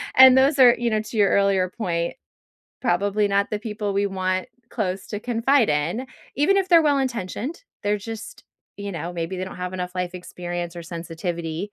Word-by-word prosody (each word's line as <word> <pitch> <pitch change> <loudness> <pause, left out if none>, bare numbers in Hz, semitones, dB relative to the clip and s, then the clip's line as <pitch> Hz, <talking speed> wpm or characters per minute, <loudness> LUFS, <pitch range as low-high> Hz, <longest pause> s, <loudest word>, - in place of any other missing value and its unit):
And 260 0 +9
those 275 +2 +4
are, 245 -2 +8
you 240 0 0
know, 215 0 +1
to 220 +1 -7
your 200 -2 +5
earlier 195 -2 +3
point, 170 -6 -2 0.7
probably 205 -1 +1
not 200 0 +1
the 210 - -1
people 210 -1 -3
we 200 +1 +1
want 185 -1 -2 0.2
close 190 -4 -3
to 210 - -4
confide 240 - +2
in. 165 - -1 0.3
Even 315 +8 +3
if 380 -1 0
they're 340 -2 +7
well 290 -2 +3
intentioned, 255 - -3 0.2
they're 205 0 +1
just 225 +1 -8 0.3
you 200 0 -5
know, 170 0 -4
maybe 170 +2 -4
they 185 - -2
don't 190 - -9
have 180 0 -4
enough 180 -1 -4
life 180 -1 -3
experience 175 -1 -5
or 170 - -6
sensitivity 170 +2 -5
200 Hz, 190 wpm, -23 LUFS, 180-230 Hz, 0.7 s, And